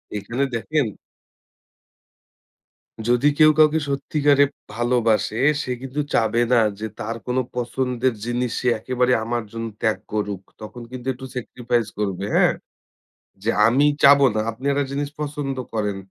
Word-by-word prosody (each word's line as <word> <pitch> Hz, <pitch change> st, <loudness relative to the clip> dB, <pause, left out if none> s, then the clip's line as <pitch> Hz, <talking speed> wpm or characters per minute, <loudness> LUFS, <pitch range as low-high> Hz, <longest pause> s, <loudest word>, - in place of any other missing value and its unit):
এখানে 120 Hz, +7 st, -2 dB
দেখেন 150 Hz, +5 st, 0 dB, 2.2 s
যদি 120 Hz, +4 st, +3 dB
কেউ 155 Hz, 0 st, +8 dB
কাউকে 155 Hz, 0 st, +5 dB
সত্যিকারে 145 Hz, 0 st, +3 dB, 0.3 s
ভালবাসে, 115 Hz, -2 st, +1 dB, 0.2 s
সে 130 Hz, -, -4 dB
কিন্তু 135 Hz, +2 st, -5 dB
চাবে 115 Hz, +1 st, +2 dB
না 120 Hz, -, +6 dB, 0.2 s
যে 110 Hz, -, -3 dB
তার 115 Hz, +2 st, -3 dB
কোন 125 Hz, +1 st, -1 dB, 0.2 s
পছন্দের 125 Hz, 0 st, -1 dB
জিনিস 120 Hz, 0 st, -1 dB
সে 125 Hz, -, -2 dB
একেবারে 125 Hz, +2 st, +1 dB
আমার 120 Hz, 0 st, -2 dB
জন্য 115 Hz, 0 st, -5 dB, 0.2 s
ত্যাগ 110 Hz, -1 st, +1 dB, 0.2 s
করুক। 105 Hz, -2 st, -2 dB, 0.2 s
তখন 115 Hz, +3 st, -9 dB
কিন্তু 130 Hz, 0 st, -8 dB
একটু 130 Hz, +1 st, -10 dB
sacrifice 120 Hz, -2 st, -2 dB
করবে, 100 Hz, -2 st, -2 dB
হ্যাঁ? -, -, +4 dB, 0.9 s
যে 110 Hz, -, +1 dB, 0.2 s
আমি 130 Hz, +6 st, +4 dB, 0.2 s
চাবো 140 Hz, 0 st, +7 dB
না। 110 Hz, -, +1 dB
আপনি 115 Hz, +4 st, -13 dB
একটা 140 Hz, 0 st, +1 dB
জিনিস 140 Hz, +1 st, -2 dB
পছন্দ 145 Hz, -2 st, -3 dB, 0.2 s
করেন। 105 Hz, -2 st, -1 dB
125 Hz, 140 wpm, -22 LUFS, 115-140 Hz, 2.2 s, কেউ